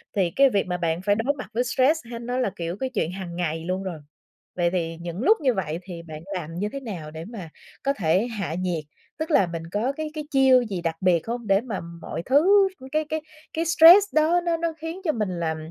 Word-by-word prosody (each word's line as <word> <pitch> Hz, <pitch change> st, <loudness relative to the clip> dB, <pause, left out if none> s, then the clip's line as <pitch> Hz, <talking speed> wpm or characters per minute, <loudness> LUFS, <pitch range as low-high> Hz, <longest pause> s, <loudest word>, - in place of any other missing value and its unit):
Thì 180 Hz, -4 st, +1 dB
cái 275 Hz, 0 st, +6 dB
việc 200 Hz, -5 st, +1 dB
mà 180 Hz, -, -1 dB
bạn 170 Hz, 0 st, -1 dB
phải 205 Hz, +1 st, +2 dB
đối 235 Hz, +6 st, 0 dB
mặt 255 Hz, -, -7 dB
với 245 Hz, -, +1 dB
stress 265 Hz, +6 st, +2 dB
hay 235 Hz, -, -6 dB
nó 245 Hz, +2 st, -3 dB
là, 250 Hz, -5 st, +1 dB
kiểu, 170 Hz, +2 st, -4 dB
cái 260 Hz, -, -2 dB
chuyện 200 Hz, -9 st, -1 dB
hàng 180 Hz, -2 st, -6 dB
ngày 165 Hz, -2 st, -2 dB
luôn 185 Hz, +1 st, -2 dB
rồi. 175 Hz, -5 st, -5 dB, 0.6 s
Vậy 175 Hz, -1 st, +1 dB
thì 165 Hz, -2 st, -2 dB
những 175 Hz, +4 st, -5 dB
lúc 435 Hz, +6 st, +5 dB
như 260 Hz, -4 st, +3 dB
vậy 170 Hz, -4 st, -3 dB
thì 175 Hz, -2 st, -8 dB
bạn 155 Hz, -2 st, -9 dB
làm 165 Hz, -3 st, -5 dB
như 205 Hz, +4 st, -2 dB
thế 275 Hz, -, -3 dB
nào 180 Hz, -, -7 dB
để 160 Hz, +1 st, -7 dB
mà 195 Hz, -7 st, -8 dB, 0.3 s
có 275 Hz, 0 st, +2 dB
thể 185 Hz, -, +1 dB
hạ 200 Hz, -9 st, -4 dB
nhiệt? 175 Hz, -3 st, -2 dB, 0.4 s
Tức 315 Hz, +1 st, -3 dB
là 195 Hz, -10 st, +4 dB
mình 165 Hz, -1 st, -5 dB
có 225 Hz, +6 st, 0 dB
cái 310 Hz, +1 st, -5 dB
cái 305 Hz, -1 st, -4 dB
chiêu 265 Hz, -2 st, +5 dB
gì 195 Hz, -6 st, -4 dB
đặc 165 Hz, -1 st, -1 dB
biệt 175 Hz, -2 st, +2 dB
hông, 235 Hz, -1 st, -4 dB
để 195 Hz, +1 st, +4 dB
mà 230 Hz, -5 st, -4 dB, 0.2 s
mọi -, -, -5 dB
thứ 385 Hz, +9 st, +5 dB, 0.2 s
cái 310 Hz, +1 st, 0 dB
cái 315 Hz, 0 st, -2 dB, 0.3 s
cái 330 Hz, +1 st, -1 dB
stress 345 Hz, +5 st, +8 dB
đó 325 Hz, +3 st, +4 dB
nó 335 Hz, -1 st, +1 dB
nó 330 Hz, -1 st, -2 dB
khiến 325 Hz, +4 st, -6 dB
cho 315 Hz, -, +3 dB
mình 215 Hz, -8 st, -2 dB
làm 160 Hz, -1 st, -1 dB
205 Hz, 245 wpm, -24 LUFS, 170-275 Hz, 0.6 s, stress